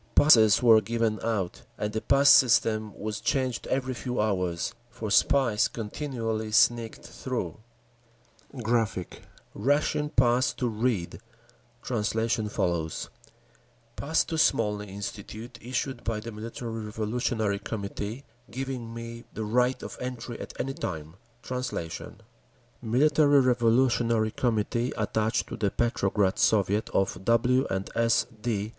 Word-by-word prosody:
Passes 110 -8 +6
were 115 -2 +7
given 115 0 -1
out, 105 -6 -2 0.2
and 105 0 -3
the 110 - -2
pass 140 +1 +3
system 110 -5 +5
was 105 0 -4
changed 130 -3 -1
every 130 0 -1
few 125 +1 -4
hours; 90 -5 -1 0.2
for 110 -3 -6
spies 125 -4 +3
continually 115 -2 -4
sneaked 115 +1 +2
through…. 120 -11 -4 1.1
[Graphic, 110 -6 0
page - - -12 0.3
49: 105 - -6
Russian 150 +1 +2
Pass 125 -2 +3
to 125 - -2
Reed, 110 -5 -1 0.6
translation 110 -1 -1
follows] 85 -5 -2 0.8
Pass 160 +3 +1
to 160 -2 -3
Smolny 105 -8 +2
Institute, 100 +4 -7
issued 125 +1 -3
by 115 -2 -2
the 115 +2 -7
Military 115 +1 -6
Revolutionary 110 -1 -1
Committee, 105 +4 -5 0.3
giving 130 -2 -5
me 115 +1 -8
the 110 - -3
right 125 +4 +1
of - - -8
entry 125 -2 -5
at - - -9
any 135 +2 -2
time. 80 - -5 0.3
(Translation) 125 -11 -5 0.6
Military 145 +4 +4
Revolutionary 120 -2 +2
Committee 115 +1 0
attached 110 +2 0
to - - -4
the 105 -3 +1
Petrograd 100 -4 0
Soviet 105 0 +2
of 95 0 -1
W. 125 +4 +3
& - - -11
S. 115 0 +3 0.2
D. 105 -3 -1
115 Hz, 125 wpm, -27 LUFS, 105-125 Hz, 1.1 s, were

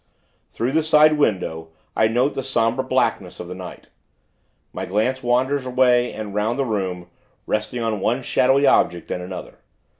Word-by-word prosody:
Through 120 +3 -2
the 160 +3 +2
side 155 -1 +4
window, 85 - -1 0.3
I 110 - +3
note 125 +5 +1
the - - -3
somber 125 -1 0
blackness 120 -8 -1
of 90 - -7
the 90 - -6
night. 90 -1 -10 0.8
My - - -5
glance 110 +7 -1
wanders 130 +3 +1
away, 125 -1 +2
and 105 -2 -7
'round 105 +4 -1
the 135 - 0
room; 95 -6 -3 0.4
resting 110 +3 -2
on 110 -2 -1
one 120 +7 0
shadowy 135 +3 +3
object 85 -9 +2
and 90 - -3
another. 90 +1 -8
120 Hz, 160 wpm, -21 LUFS, 100-130 Hz, 0.8 s, side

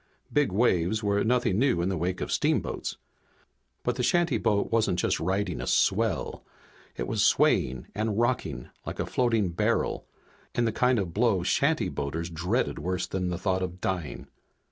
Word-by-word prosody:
Big 145 -7 +2
waves 100 -1 +2
were 100 0 +2
nothing 115 -4 +2
new 130 -7 +2
in 85 - 0
the 95 - -1
wake 90 +2 -2
of - - -3
steamboats, - - 0 0.9
but 125 0 -1
the - - 0
shantyboat 125 -8 +1
wasn't 110 -6 +2
just - - +1
riding 95 +1 -1
a - - -5
swell. 105 -2 +1 0.5
It - - -3
was - - 0
swaying 65 0 +3
and 105 0 -1
rocking 120 +2 -1
like - - -6
a - - 0
floating 115 -6 +1
barrel 85 - 0 0.5
in 120 - +2
the 115 - +1
kind 125 +3 +2
of 90 -6 -2
blow 110 -3 +2
Shantyboaters 80 +3 0
dreaded 90 +10 -1
worse 90 0 -2
than 90 -1 -2
the 90 - -2
thought 95 -1 0
of 90 0 -4
dying. 90 -5 -3
100 Hz, 165 wpm, -27 LUFS, 90-115 Hz, 0.9 s, swaying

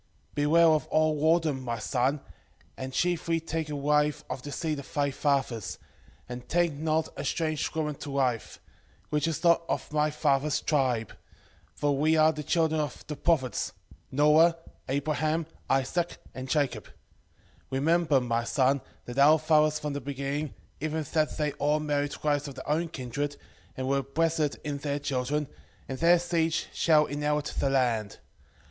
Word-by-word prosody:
4:12 - - -41
Beware 155 +3 +4
of 155 -1 +2
all 155 0 +2 0.2
whoredom, 150 -5 -2
my 120 -2 -3
son, 130 +6 0 0.5
and 130 0 -6
chiefly 170 +2 0
take 160 -1 -3
a 150 - -3
wife 150 +1 +1
of 130 - -4
the 145 - -7
seed 155 0 -2
of 140 - -10
thy 140 -1 +1
fathers, 130 -8 -1 0.5
and 125 0 -8
take 175 -2 +2
not 155 +2 0
a - - -5
strange 155 -2 -1
woman 150 -2 -1
to 145 - -8
wife, 130 -4 -1 0.5
which 150 +2 +1
is 165 +1 -3
not 170 -1 +5
of - - -1
thy 150 0 +2
father's 150 -1 +1
tribe: 125 -7 0 0.6
for 145 -1 +1
we 155 +3 +3
are 155 0 +5
the 150 - -5
children 160 +1 +1
of 150 - -5
the 150 - -5
prophets, 140 -5 0 0.4
Noe, 150 +4 +5 0.3
Abraham, 155 +3 0 0.2
Isaac, 135 +6 0 0.2
and 130 0 -7
Jacob: 130 - 0 0.8
remember, 155 +1 +2
my 120 -2 -1
son, 135 +2 +2 0.2
that 120 +2 -4
our 150 +3 +7
fathers 155 -1 +3
from 150 -1 -4
the 145 - -4
beginning, 140 +2 -3 0.2
even 155 +1 -2
that 155 -2 +1
they 150 -2 0
all 150 +1 +2
married 145 -1 -2
wives 145 -1 +1
of 140 - -8
their - - -9
own 160 +3 +1
kindred, 145 +1 -4 0.4
and 130 0 -2
were 140 +1 +2
blessed 155 +2 0
in 145 -1 -3
their 140 0 -2
children, 140 +1 -1 0.4
and 130 - -5
their 170 +1 +6
seed 170 -2 0 0.2
shall 155 -2 +4
inherit 150 0 -1
the 140 - +2
land. 120 -6 0
150 Hz, 165 wpm, -28 LUFS, 135-155 Hz, 0.8 s, our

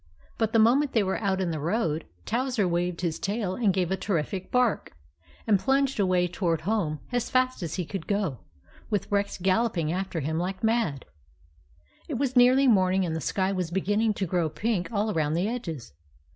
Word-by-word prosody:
But 225 -1 +1
the 225 - +3
moment 260 +6 +4
they 220 - +3
were 190 +2 -2
out 195 -2 0
in 180 -3 0
the 155 - -3
road, 165 -1 -1 0.2
Towser 245 -4 0
waved 175 0 -1
his 170 -3 -2
tail 200 -2 -2
and 215 -1 +2
gave 185 -1 -1
a - - +2
terrific 185 -1 -2
bark, 250 - +1 0.5
and 210 -3 +3
plunged 270 +1 +1
away 185 -2 +2
toward 170 -3 -1
home 170 -5 -1
as 245 -1 -1
fast 255 -2 +1
as 165 -2 -3
he 180 - -2
could 190 -1 -6
go, 200 - -1 0.5
with 205 -2 -2
Rex 200 0 0
gal 190 +4 +2
loping 170 -9 -1
after 185 -3 -3
him 160 +3 -1
like 185 +3 -3
mad. 220 - 0 1.0
It 295 - -3
was 260 +1 -1
nearly 255 +2 +6
morning, 190 -4 +3
and 160 -2 -2
the 160 - -3
sky 190 +5 0
was 185 -3 -2
beginning 205 +4 +1
to 195 - -1
grow 175 -2 0
pink 205 +3 -2
all 215 0 0
around 155 -4 0
the 180 +4 +1
edges. 165 - -5
190 Hz, 195 wpm, -27 LUFS, 175-225 Hz, 1.0 s, nearly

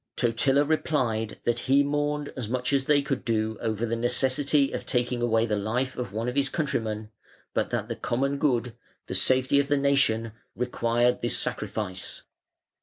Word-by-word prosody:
Totila 135 +4 +2
replied 125 -8 0
that 120 0 +1
he 140 +1 +5
mourned 145 0 -1
as 120 -5 -4
much 125 +2 -1
as 135 -1 +2
they 145 -1 +3
could 135 -2 -2
do 110 -1 0
over 110 0 -1
the 115 0 -1
necessity 135 +4 +2
of - - -4
taking 125 0 -1
away 115 -1 +2
the 110 -2 0
life 120 +6 -1
of 120 -6 -4
one 110 +3 -3
of 125 - -1
his 140 -1 +2
countrymen, 110 -8 -2 0.4
but - - 0
that - - -2
the - - -4
common 140 +3 -1
good, 125 -5 +1 0.3
the - - -5
safety 130 +2 +3
of 140 - +1
the 145 0 +2
nation, 135 -5 +2 0.2
required 120 0 +1
this - - +1
sacrifice. 95 -3 -3
125 Hz, 175 wpm, -26 LUFS, 115-140 Hz, 0.4 s, he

